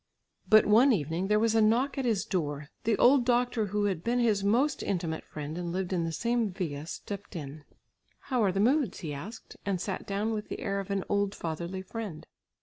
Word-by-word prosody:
But 215 Hz, 0 st, +7 dB
one 235 Hz, +6 st, +6 dB
evening, 165 Hz, -, 0 dB
there 210 Hz, +1 st, +3 dB
was 225 Hz, 0 st, +2 dB
a 225 Hz, -, +4 dB
knock 235 Hz, +6 st, +3 dB
at 270 Hz, -2 st, -2 dB
his 215 Hz, -6 st, +1 dB
door; 150 Hz, -5 st, -2 dB, 0.2 s
the 220 Hz, -2 st, +2 dB
old 260 Hz, +1 st, +6 dB
doctor 245 Hz, -2 st, +1 dB
who 205 Hz, +1 st, 0 dB
had 185 Hz, -5 st, -1 dB
been 240 Hz, +1 st, +1 dB
his 220 Hz, -5 st, +2 dB
most 250 Hz, +8 st, +2 dB
intimate 170 Hz, -4 st, -2 dB
friend 150 Hz, +1 st, -6 dB
and 175 Hz, -1 st, -3 dB
lived 185 Hz, +1 st, -2 dB
in 170 Hz, -2 st, 0 dB
the 165 Hz, -, -2 dB
same 235 Hz, +4 st, 0 dB
villa, 160 Hz, -6 st, -4 dB
stepped 200 Hz, +2 st, -7 dB
in. 145 Hz, -1 st, -7 dB, 0.6 s
"How 255 Hz, -3 st, -1 dB
are 195 Hz, -, +3 dB
the 195 Hz, -, -2 dB
moods?" 250 Hz, -, +2 dB
he 155 Hz, -5 st, -4 dB
asked, 195 Hz, +11 st, -9 dB
and 195 Hz, -3 st, -1 dB
sat 190 Hz, +1 st, -4 dB
down 205 Hz, +3 st, -1 dB
with 210 Hz, -1 st, -4 dB
the -, -, -5 dB
air 200 Hz, -1 st, -1 dB
of 195 Hz, 0 st, -6 dB
an 200 Hz, -1 st, 0 dB
old 200 Hz, 0 st, 0 dB
fatherly 170 Hz, +3 st, -4 dB
friend. 195 Hz, -5 st, -6 dB
200 Hz, 215 wpm, -29 LUFS, 175-225 Hz, 0.6 s, But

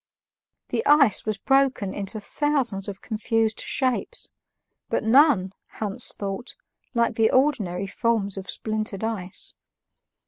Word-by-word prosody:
The -, -, -1 dB
ice 280 Hz, -9 st, +5 dB
was 215 Hz, -1 st, 0 dB
broken 270 Hz, -5 st, +2 dB
into 200 Hz, +2 st, -4 dB
thousands 245 Hz, -4 st, -1 dB
of 195 Hz, -1 st, -7 dB
confused 225 Hz, 0 st, 0 dB
shapes, 255 Hz, -2 st, -1 dB, 0.6 s
but -, -, 0 dB
none, 225 Hz, -6 st, +4 dB, 0.2 s
Hans 205 Hz, -2 st, -1 dB
thought, 200 Hz, +4 st, -5 dB, 0.4 s
like 235 Hz, 0 st, +2 dB
the 225 Hz, -1 st, +4 dB
ordinary 215 Hz, -10 st, +1 dB
forms 205 Hz, 0 st, 0 dB
of 195 Hz, -1 st, -7 dB
splintered 215 Hz, -2 st, -2 dB
ice. 205 Hz, -5 st, -4 dB
220 Hz, 115 wpm, -25 LUFS, 195-255 Hz, 0.6 s, ice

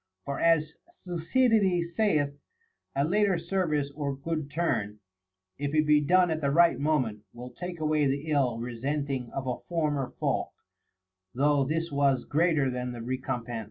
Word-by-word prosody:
For 140 Hz, -, -3 dB
as 160 Hz, -2 st, +3 dB, 0.3 s
Thucydides 180 Hz, -1 st, +1 dB
saith, 150 Hz, -10 st, +1 dB, 0.6 s
A 140 Hz, -, +2 dB
later 195 Hz, +3 st, +2 dB
service 165 Hz, -5 st, -1 dB
or 140 Hz, -2 st, -3 dB
good 155 Hz, 0 st, -3 dB
turn, 140 Hz, -10 st, -1 dB, 0.6 s
if 145 Hz, +1 st, -2 dB
it 155 Hz, 0 st, +3 dB
be 150 Hz, 0 st, +4 dB
clone 180 Hz, +2 st, +4 dB
at 160 Hz, 0 st, -2 dB
the 140 Hz, -, +1 dB
right 170 Hz, +4 st, +4 dB
moment, 130 Hz, -8 st, 0 dB
will 125 Hz, +1 st, -9 dB
take 175 Hz, +6 st, -7 dB
away 155 Hz, -2 st, +2 dB
the 140 Hz, +3 st, -2 dB
ill 130 Hz, -6 st, +2 dB
resenting 130 Hz, +2 st, -3 dB
of 135 Hz, -, -4 dB
a 125 Hz, -1 st, -2 dB
former 150 Hz, -6 st, -1 dB
fault, -, -, -1 dB, 0.8 s
though 145 Hz, +1 st, +3 dB
this 165 Hz, +3 st, -2 dB
was 140 Hz, -2 st, +2 dB
greater 155 Hz, -4 st, +2 dB
than 125 Hz, 0 st, -4 dB
the 120 Hz, -, -7 dB
recompense. 120 Hz, -2 st, -3 dB
150 Hz, 155 wpm, -28 LUFS, 135-165 Hz, 0.8 s, be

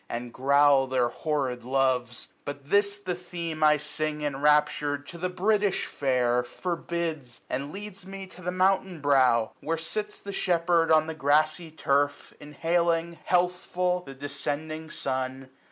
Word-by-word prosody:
And 120 Hz, 0 st, -5 dB
growl 140 Hz, 0 st, +4 dB
their 130 Hz, -2 st, +1 dB
horrid 130 Hz, -4 st, -2 dB
loves. 125 Hz, -1 st, 0 dB
But 145 Hz, 0 st, -8 dB
this 200 Hz, 0 st, +3 dB
the 190 Hz, -3 st, -3 dB
theme 170 Hz, -3 st, -5 dB
I 150 Hz, 0 st, +6 dB
sing, 150 Hz, 0 st, -2 dB
enraptured, 145 Hz, 0 st, +1 dB
to 170 Hz, -, -9 dB
the 180 Hz, +2 st, -1 dB
British 200 Hz, +2 st, +1 dB
Fair, 125 Hz, -3 st, +1 dB
Forbids, 165 Hz, -3 st, -4 dB
and 140 Hz, +3 st, -3 dB
leads 195 Hz, -1 st, -6 dB
me 195 Hz, 0 st, -7 dB
to 185 Hz, -1 st, -14 dB
the 180 Hz, 0 st, -2 dB
mountain 185 Hz, -1 st, +1 dB
brow. 130 Hz, -6 st, +3 dB
Where 165 Hz, +3 st, -2 dB
sits 210 Hz, +6 st, -3 dB
the 200 Hz, -, -7 dB
shepherd 170 Hz, -3 st, +2 dB
on 155 Hz, -1 st, +5 dB
the 160 Hz, -, -4 dB
grassy 155 Hz, +3 st, +2 dB
turf, 145 Hz, -2 st, 0 dB
830 -, -, -12 dB
Inhaling, 170 Hz, +1 st, 0 dB
healthful, 180 Hz, 0 st, +1 dB
the 135 Hz, -5 st, -10 dB
descending 145 Hz, +3 st, -3 dB
sun. 130 Hz, -1 st, -3 dB
155 Hz, 145 wpm, -27 LUFS, 140-175 Hz, -, I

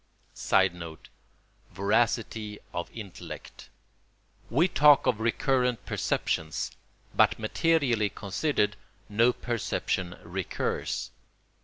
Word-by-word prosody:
[Sidenote: 90 Hz, -4 st, 0 dB, 0.6 s
Voracity 110 Hz, +1 st, 0 dB, 0.2 s
of 85 Hz, -, -3 dB
intellect.] 105 Hz, -6 st, -9 dB, 0.8 s
We 150 Hz, +10 st, +4 dB
talk 150 Hz, -5 st, +6 dB
of 125 Hz, -4 st, +2 dB
recurrent 125 Hz, +1 st, +1 dB
perceptions, 80 Hz, -1 st, -1 dB, 0.4 s
but -, -, +4 dB
materially 120 Hz, -2 st, +2 dB
considered 105 Hz, -, -1 dB, 0.3 s
no 115 Hz, +4 st, +4 dB
perception 95 Hz, -7 st, -2 dB
recurs. 90 Hz, +1 st, -3 dB
110 Hz, 75 wpm, -28 LUFS, 95-125 Hz, 0.8 s, talk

